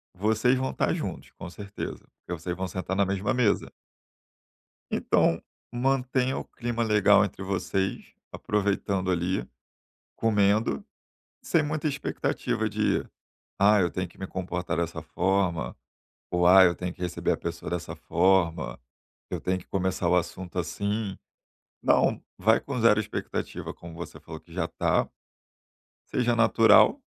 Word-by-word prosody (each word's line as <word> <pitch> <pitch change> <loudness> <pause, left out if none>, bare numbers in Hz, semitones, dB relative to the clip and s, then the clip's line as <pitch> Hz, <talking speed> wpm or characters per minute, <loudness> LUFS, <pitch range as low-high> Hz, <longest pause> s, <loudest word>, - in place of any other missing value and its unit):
Vocês 110 +6 +2
vão 130 +1 -1
estar - - 0
juntos, - - -5
com 85 - -9
certeza, 100 +2 -7
porque 90 -1 -6
vocês 85 +2 -3
vão 95 +1 -3
sentar 95 +1 -3
na 100 0 +3
mesma 95 +1 -1
mesa. 120 -4 +1 1.2
Então, - - +2 0.3
mantenha 130 +1 +1
o - - -3
clima 120 -1 -3
legal 105 -3 +5
entre 95 - -7
vocês, 95 0 -2 0.2
aproveitando 100 -2 -1
ali, 90 +2 -1 0.7
comendo, 105 -1 +2 0.6
sem 165 - +2
muita 155 +1 -1
expectativa 140 -1 -2
de: - - 0 0.6
"Ah, 105 +1 +6
eu 90 -2 +2
tenho 95 0 -2
que - - -21
me 95 - -5
comportar 90 -2 -3
dessa 85 -1 -2
forma" 90 +1 0 0.6
ou: 90 0 +3
"Ah, 95 +1 +9
eu 85 -1 +4
tenho 90 0 -4
que 90 - -16
receber 90 -1 -1
a - - -4
pessoa - - -5
dessa - - -4
forma, 90 -3 +1 0.5
eu - - -3
tenho 95 0 0
que - - -14
começar 95 -2 -1
o 90 - +4
assunto 90 +1 -3
assim". 100 +3 -2 0.7
Não. - - +3 0.2
Vai 110 +4 +4
com 135 -3 -4
zero 110 -2 +5
expectativa, 110 - -4
como 85 -1 -11
você 85 +1 -8
falou - - -9
que - - -20
já - - -1
tá. - - +1 1.0
Seja 120 -1 +1
natural, 115 0 +5
95 Hz, 145 wpm, -27 LUFS, 90-110 Hz, 1.2 s, Ah